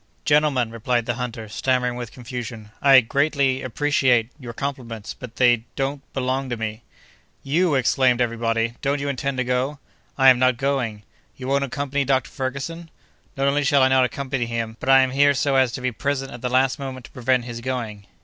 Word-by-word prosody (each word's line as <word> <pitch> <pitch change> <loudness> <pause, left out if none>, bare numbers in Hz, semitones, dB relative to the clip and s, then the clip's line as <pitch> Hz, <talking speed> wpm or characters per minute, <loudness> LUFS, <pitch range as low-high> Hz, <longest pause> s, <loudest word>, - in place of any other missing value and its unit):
"Gentlemen," 145 -6 +2
replied 115 +1 -1
the 120 - -1
hunter, 120 -2 -5
stammering 125 +2 0
with 120 -2 -6
confusion, 115 -3 -7
"I 135 -2 +7
greatly—appreciate—your 130 -2 +1
compliments—but 120 -3 -6
they—don't—belong 130 +2 0
to 120 - -3
me." 110 0 -4 0.6
"You!" 160 +3 +2
exclaimed 125 -1 +3
every 120 -1 0
body, 115 0 0
"don't 140 +1 0
you 140 - -3
intend 140 0 -2
to 130 - +1
go?" 125 +4 -1 0.4
"I 135 -1 +7
am 125 -1 +5
not 130 -1 +3
going!" 130 -6 -1 0.3
"You 130 - -7
won't 140 +1 +1
accompany 140 +1 -2
Dr. 130 -2 0
Ferguson?" 140 +5 -5 0.5
"Not 135 0 +1
only 145 +1 +2
shall 140 -1 +4
I 130 - +5
not 130 -1 +4
accompany 130 -1 -2
him, 115 -1 -3
but - - -4
I 135 0 +8
am 130 0 +1
here 145 +1 +4
so 135 +1 +1
as 130 -2 +3
to 125 - -5
be 130 0 -1
present 135 +2 -2
at 120 - -9
the 125 - -1
last 130 +2 +2
moment 130 -2 -6
to - - -15
prevent 125 -1 0
his 120 -1 -6
going." 115 -5 -4
130 Hz, 180 wpm, -23 LUFS, 120-140 Hz, 0.6 s, I